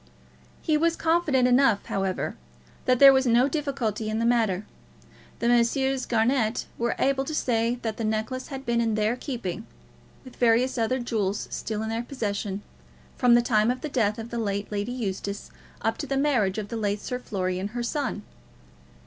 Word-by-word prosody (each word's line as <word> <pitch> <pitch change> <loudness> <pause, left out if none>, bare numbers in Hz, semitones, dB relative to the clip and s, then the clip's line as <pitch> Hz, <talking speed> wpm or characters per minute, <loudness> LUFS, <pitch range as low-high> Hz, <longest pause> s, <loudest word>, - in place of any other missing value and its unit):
He 310 -2 +2
was 335 +2 +2
confident 320 -6 +2
enough, 245 -4 +3
however, 195 -1 -2 0.5
that 255 0 +3
there 275 +1 +9
was 265 -1 +2
no 240 +3 +4
difficulty 260 -8 -2
in 215 - -1
the 230 - 0
matter. 220 -5 +1 0.7
The 235 - -1
Messrs. 255 +3 +2
Garnett 230 0 +1
were 235 0 0
able 270 0 +1
to 310 +3 -4
say 235 -3 +1
that 220 -2 -3
the 230 - -3
necklace 220 +4 -2
had 270 -1 -7
been 235 -1 +1
in 225 -2 +1
their 215 +2 +1
keeping, 230 - -5 0.6
with 255 - -13
various 240 +2 +3
other 230 +3 +1
jewels 215 -5 -2
still 220 -1 -3
in 220 - -3
their 225 +1 -1
possession, 205 -5 -3 0.5
from 245 -2 +5
the 240 - +4
time 215 -2 +3
of 250 +1 -1
the 305 - -4
death 215 -6 +1
of 230 +1 -7
the 235 - -2
late 200 -2 -2
Lady 205 +3 -2
Eustace, 200 -4 -4 0.3
up 225 0 0
to - - -4
the 275 - -1
marriage 245 -9 +2
of 210 -1 -4
the 230 - -4
late 205 -1 -1
Sir 250 +4 -4
Florian, 185 -4 -2
her 240 +3 -4
son. 250 -4 -2
235 Hz, 185 wpm, -26 LUFS, 215-255 Hz, 0.7 s, there